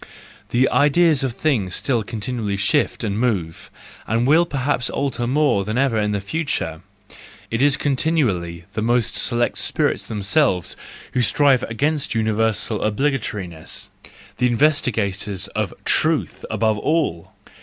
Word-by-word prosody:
The 125 Hz, +2 st, +3 dB
ideas 150 Hz, 0 st, +3 dB
of 130 Hz, -3 st, -1 dB
things 115 Hz, -, 0 dB
still 125 Hz, -4 st, 0 dB
continually 110 Hz, -1 st, -3 dB
shift 100 Hz, -, +1 dB
and 105 Hz, 0 st, -1 dB
move, 95 Hz, -10 st, -2 dB, 0.4 s
and 115 Hz, +2 st, +1 dB
will 160 Hz, +5 st, +4 dB
perhaps 135 Hz, -3 st, -1 dB
alter 130 Hz, -4 st, -2 dB
more 135 Hz, -6 st, +2 dB
than 110 Hz, +4 st, -3 dB
ever 135 Hz, -3 st, +2 dB
in 105 Hz, 0 st, 0 dB
the 100 Hz, -, -1 dB
future; 100 Hz, -, -3 dB, 0.7 s
it 115 Hz, +2 st, 0 dB
is 145 Hz, +1 st, +4 dB
continually 120 Hz, -, 0 dB
the 110 Hz, -, -2 dB
most 120 Hz, 0 st, +1 dB
select 120 Hz, 0 st, 0 dB
spirits -, -, 0 dB
themselves 105 Hz, -, +1 dB, 0.4 s
who 125 Hz, -, +1 dB
strive 135 Hz, +1 st, +4 dB
against 145 Hz, +4 st, -1 dB
universal 110 Hz, -1 st, +1 dB
obligatoriness—the 105 Hz, -, -3 dB
investi¬ 140 Hz, +2 st, +2 dB
gators 100 Hz, -2 st, -2 dB
of 105 Hz, -3 st, -2 dB
truth -, -, +1 dB
above 110 Hz, -2 st, +1 dB
all! 150 Hz, -, -1 dB
120 Hz, 130 wpm, -21 LUFS, 105-140 Hz, 0.7 s, will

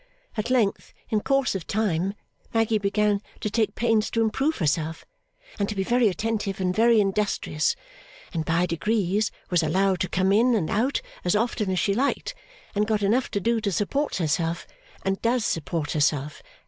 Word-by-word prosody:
At 220 Hz, +1 st, -2 dB
length, 235 Hz, -6 st, 0 dB
in 215 Hz, -1 st, +1 dB
course 275 Hz, +1 st, +1 dB
of 190 Hz, -5 st, -5 dB
time, 195 Hz, -2 st, 0 dB, 0.4 s
Maggy 225 Hz, -1 st, +2 dB
began 205 Hz, 0 st, +1 dB, 0.2 s
to 215 Hz, -, -3 dB
take 220 Hz, 0 st, +1 dB
pains 225 Hz, -2 st, +2 dB
to 230 Hz, -, 0 dB
improve 270 Hz, +8 st, 0 dB
herself, 160 Hz, -1 st, -1 dB, 0.5 s
and 200 Hz, -, 0 dB
to 210 Hz, -, -3 dB
be 195 Hz, -, 0 dB
very 240 Hz, +3 st, +3 dB
attentive 210 Hz, 0 st, -2 dB
and 185 Hz, -1 st, 0 dB
very 230 Hz, 0 st, +5 dB
industrious; 195 Hz, -6 st, 0 dB, 0.6 s
and 165 Hz, -2 st, -1 dB
by 165 Hz, +2 st, +1 dB
degrees 200 Hz, +3 st, 0 dB, 0.2 s
was 175 Hz, -, +4 dB
allowed 185 Hz, +4 st, +1 dB
to 185 Hz, -, -1 dB
come 190 Hz, +1 st, +1 dB
in 235 Hz, +4 st, +4 dB
and 180 Hz, -8 st, -1 dB
out 245 Hz, +7 st, +1 dB, 0.2 s
as 180 Hz, +2 st, +2 dB
often 220 Hz, -2 st, 0 dB
as 185 Hz, -, 0 dB
she 200 Hz, -, +2 dB
liked, 280 Hz, -, 0 dB, 0.4 s
and 210 Hz, +1 st, +1 dB
got 215 Hz, -2 st, 0 dB
enough 235 Hz, +6 st, +2 dB
to 200 Hz, -, -1 dB
do 230 Hz, +3 st, +1 dB
to 200 Hz, -, -1 dB
support 275 Hz, -, -1 dB
herself, 165 Hz, 0 st, -1 dB, 0.4 s
and 195 Hz, 0 st, 0 dB
does 235 Hz, -1 st, +1 dB
support 155 Hz, -1 st, -2 dB
herself. 150 Hz, -1 st, 0 dB
205 Hz, 175 wpm, -25 LUFS, 180-225 Hz, 0.6 s, very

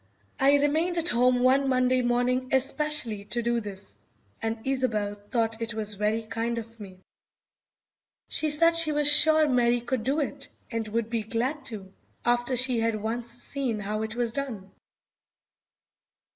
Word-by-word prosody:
I 275 Hz, +1 st, +5 dB
remained 315 Hz, +5 st, +1 dB
at 335 Hz, +1 st, +3 dB
home 245 Hz, +1 st, +2 dB
one 265 Hz, +2 st, +3 dB
Monday 255 Hz, 0 st, +2 dB
morning 250 Hz, +1 st, 0 dB
especially 265 Hz, -5 st, +1 dB
to 235 Hz, +3 st, -2 dB
do 235 Hz, 0 st, 0 dB
this, 205 Hz, -3 st, -8 dB, 0.5 s
and 225 Hz, 0 st, -2 dB
Isobel 240 Hz, -6 st, -1 dB, 0.2 s
thought 225 Hz, -1 st, 0 dB
it 230 Hz, -1 st, -3 dB
was 215 Hz, -1 st, -2 dB
very 210 Hz, +2 st, -1 dB
kind 230 Hz, +1 st, -3 dB
of 230 Hz, 0 st, -8 dB
me. 190 Hz, -3 st, -11 dB, 1.3 s
She 310 Hz, -, -1 dB
said 330 Hz, +3 st, +4 dB
she 330 Hz, -2 st, +4 dB
was 295 Hz, -1 st, +1 dB
sure 310 Hz, +1 st, +5 dB
Mary 245 Hz, -2 st, +2 dB
could 240 Hz, -1 st, -3 dB
do 275 Hz, +5 st, 0 dB
it, 280 Hz, -1 st, -4 dB, 0.2 s
and 230 Hz, -2 st, -3 dB
would 225 Hz, +1 st, -3 dB
be 230 Hz, -2 st, 0 dB
glad 240 Hz, +7 st, -3 dB
to, 200 Hz, -4 st, -6 dB, 0.3 s
after 240 Hz, +2 st, +1 dB
she 250 Hz, -1 st, +3 dB
had 225 Hz, -1 st, 0 dB
once 230 Hz, +3 st, -4 dB
seen 265 Hz, -6 st, -3 dB
how 210 Hz, +1 st, -3 dB
it 220 Hz, 0 st, -4 dB
was 240 Hz, -1 st, -1 dB
done. 230 Hz, -9 st, -5 dB
240 Hz, 160 wpm, -26 LUFS, 225-270 Hz, 1.3 s, I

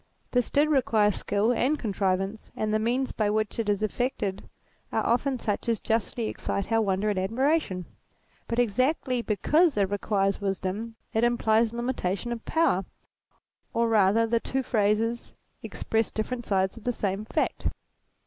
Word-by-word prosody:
This 245 Hz, -2 st, +1 dB
did 290 Hz, +2 st, +3 dB
require 230 Hz, -8 st, +3 dB
skill 205 Hz, +3 st, 0 dB
and 260 Hz, +5 st, +1 dB
contrivance, 195 Hz, -2 st, -1 dB
and 215 Hz, 0 st, -1 dB
the 215 Hz, -, +3 dB
means 245 Hz, +4 st, 0 dB
by 215 Hz, -2 st, 0 dB
which 215 Hz, +1 st, -1 dB
it 220 Hz, -2 st, 0 dB
is 205 Hz, +1 st, +1 dB
effected 215 Hz, -3 st, -2 dB, 0.4 s
are -, -, 0 dB
often 255 Hz, +3 st, +1 dB
such 215 Hz, +1 st, -2 dB
as 225 Hz, -3 st, +1 dB
justly 225 Hz, +1 st, -1 dB
excite 200 Hz, 0 st, -3 dB
our 225 Hz, 0 st, +4 dB
wonder 200 Hz, 0 st, +1 dB
and 195 Hz, -, -1 dB
admiration: 225 Hz, -, 0 dB, 0.6 s
but 230 Hz, -, -2 dB
exactly 250 Hz, +2 st, +1 dB
because 300 Hz, -, +2 dB
it 200 Hz, -1 st, +2 dB
requires 200 Hz, 0 st, 0 dB
wisdom, 200 Hz, +3 st, -3 dB, 0.2 s
it 225 Hz, -, +2 dB
implies 230 Hz, -2 st, +3 dB
limitation 235 Hz, -3 st, -2 dB
of 235 Hz, -1 st, -4 dB
power, 310 Hz, -, +2 dB, 0.9 s
or 230 Hz, 0 st, +2 dB
rather 215 Hz, +1 st, +4 dB
the 230 Hz, +1 st, +1 dB
two 265 Hz, +3 st, -2 dB
phrases 225 Hz, 0 st, 0 dB, 0.3 s
express 225 Hz, 0 st, -1 dB
different 240 Hz, +2 st, -4 dB
sides 190 Hz, +1 st, +1 dB
of 225 Hz, -, -11 dB
the 245 Hz, -, +1 dB
same 200 Hz, -3 st, -2 dB
fact. 215 Hz, -, -1 dB
225 Hz, 155 wpm, -27 LUFS, 205-240 Hz, 0.9 s, our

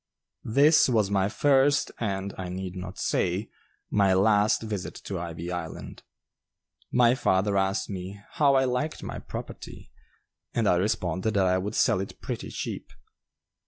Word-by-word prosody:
This 145 Hz, +5 st, +5 dB
was 110 Hz, -5 st, +2 dB
my 100 Hz, -1 st, +2 dB
first, 140 Hz, +4 st, +3 dB
and, 100 Hz, -3 st, -2 dB
I 90 Hz, -1 st, -5 dB
need 95 Hz, 0 st, -5 dB
not 90 Hz, 0 st, -7 dB
say, 95 Hz, +5 st, -1 dB, 0.4 s
my 100 Hz, -2 st, +3 dB
last 105 Hz, +3 st, +3 dB
visit 105 Hz, -4 st, -4 dB
to 95 Hz, -3 st, -4 dB
"Ivy 85 Hz, 0 st, -5 dB
Island." 90 Hz, -2 st, -6 dB, 0.9 s
My 120 Hz, -1 st, +5 dB
father 100 Hz, -4 st, +1 dB
asked 95 Hz, +1 st, 0 dB
me 95 Hz, 0 st, -6 dB
"how 140 Hz, -3 st, +3 dB
I 135 Hz, -, +4 dB
liked 130 Hz, +5 st, -2 dB
my -, -, -5 dB
property?" -, -, -9 dB, 0.6 s
and 115 Hz, -3 st, +1 dB
I 90 Hz, -, +4 dB
responded 95 Hz, +1 st, -1 dB
that 95 Hz, -1 st, +3 dB
I 95 Hz, 0 st, +2 dB
would 105 Hz, +3 st, -4 dB
sell -, -, +3 dB
it 95 Hz, -, -8 dB
pretty -, -, -5 dB
cheap. -, -, -5 dB
100 Hz, 150 wpm, -27 LUFS, 95-115 Hz, 0.9 s, This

